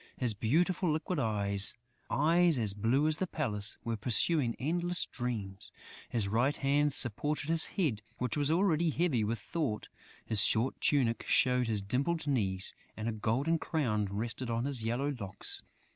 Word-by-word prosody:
His 125 -4 0
beautiful, 165 - +1
liquid 160 +2 -2
eyes, 100 -4 +1 0.3
eyes 165 +2 +3
as 110 -4 -1
blue 115 +8 +1
as 155 -1 +1
the 190 - -2
palace, 105 -11 -2
were 115 -1 -2
pursuing 120 - +2
endless 175 +6 -1
dreams; 110 -6 -5 0.4
his 110 -4 -1
right 120 +8 +1
hand 145 +1 +1
supported 145 +5 -1
his 165 -1 +6
head, 140 - 0 0.2
which 125 -3 -2
was 145 -1 +1
already 170 -1 +2
heavy 155 -8 +1
with 115 +3 -1
thought; 140 - -4 0.4
his 105 -3 +6
short 115 +5 +2
tunic 120 -6 +1
showed 125 -1 +3
his 105 -3 0
dimpled 140 +10 -1
knees; 100 -10 0 0.2
and 110 +1 -4
a - - 0
golden 125 +10 0
crown 115 -12 -1
rested 115 +5 -4
on 115 +1 -1
his 135 -5 -2
yellow 130 +6 -1
locks. 95 -3 -3
125 Hz, 160 wpm, -31 LUFS, 110-155 Hz, 0.4 s, his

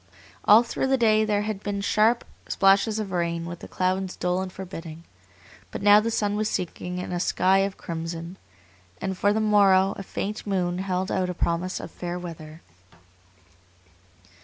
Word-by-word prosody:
All 215 +3 +7
through 240 +2 -2
the 265 0 +3
day 220 -2 +4
there 210 -1 0
had 210 -2 -4
been 205 -1 -3
sharp 215 +4 +2 0.2
splashes 195 +3 +3
of 210 -3 -4
rain 170 -1 -1
with 170 0 -7
the - - -10
clouds 185 0 -1
dull 180 +1 -1
and 190 -1 -5
forbidding, 165 -4 -8 0.7
but - - -6
now 205 0 +8
the 225 +2 -1
sun 205 -2 0
was 215 0 0
sinking 180 0 -4
in 180 - -5
a 175 - -2
sky 190 +2 +2
of 195 0 -1
crimson, 165 +1 -6 0.6
and 190 0 -3
for 205 +2 +2
the 215 - +1
morrow 200 -2 +4
a - - -5
faint 205 +2 -5
moon 180 -2 -1
held 190 0 -2
out 185 -1 0
a 180 - -4
promise 170 +2 -1
of - - -8
fair 175 0 -5
weather. 160 -3 -9
190 Hz, 175 wpm, -25 LUFS, 180-205 Hz, 0.7 s, now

